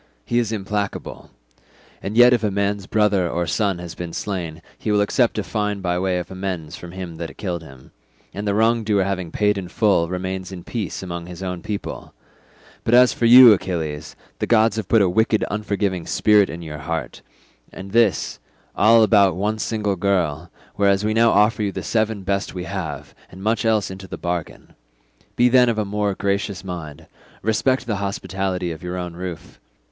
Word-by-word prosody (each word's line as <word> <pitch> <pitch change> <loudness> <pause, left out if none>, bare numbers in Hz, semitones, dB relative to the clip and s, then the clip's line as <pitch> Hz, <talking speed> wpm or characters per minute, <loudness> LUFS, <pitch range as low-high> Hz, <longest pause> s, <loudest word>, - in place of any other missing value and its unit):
He 120 - +1
is 115 -2 -1
implacable—and 100 - -6
yet 120 +1 +8
if 120 -2 +1
a 105 - +2
man's 100 0 -1
brother 105 -4 +2
or 85 +1 -1
son 100 0 0
has 85 -1 -7
been 85 -2 -7
slain 85 -5 -4
he 110 - -3
will 105 - +3
accept 115 +4 +1
a 105 - 0
fine 105 -1 -2
by 90 -1 -1
way 95 -1 0
of 90 - -5
amends 95 -5 -4
from 90 - -10
him 90 -3 -7
that 85 0 -7
killed 90 -5 -3
him, 65 -5 -15 0.4
and 105 +1 -5
the 100 - +1
wrong 115 +1 +2
doer 105 -2 +2
having 95 -3 -3
paid 105 -1 +1
in 90 - -6
full 95 -3 +2
remains 95 +1 -4
in 90 -2 -8
peace 110 -5 -4
among 85 -2 -6
his 90 +1 -8
own 90 -2 -4
people; 105 -2 -6 0.7
but 115 - +3
as 125 0 +6
for 120 - -1
you, 125 -1 +10
Achilles, 80 -6 -4 0.2
the - - -1
gods 110 -1 +4
have 110 - -3
put 115 -3 +4
a - - +3
wicked 110 +4 +2
unforgiving 100 -4 -2
spirit 105 -2 +4
in 85 +1 -7
your 75 -2 -7
heart, 80 +1 -4 0.5
and 95 +1 -9
this, 115 -2 +2 0.4
all 115 +1 +6
about 100 -4 +4
one 105 +4 -1
single 105 -3 -1
girl, 85 -4 0 0.3
whereas 100 0 +2
we 110 - +1
now 115 +1 +4
offer 105 +1 +3
you 100 -1 0
the 95 -1 -6
seven 110 +3 -1
best 100 0 -2
we 90 - -4
have, - - -5 0.2
and 95 +1 -11
much 110 +1 0
else 110 -4 +1
into 95 0 -9
the - - -7
bargain. 85 -2 -5 0.6
Be 120 - +4
then 125 0 +5
of 115 - -1
a 110 - 0
more 105 0 -1
gracious 100 -1 -2
mind, 85 -6 -7 0.4
respect 125 +5 +1
the 110 -4 -2
hospitality 95 -2 -3
of 80 - -8
your 90 +1 -5
own 90 -1 -5
roof. 90 -1 -8
100 Hz, 190 wpm, -21 LUFS, 90-105 Hz, 0.7 s, you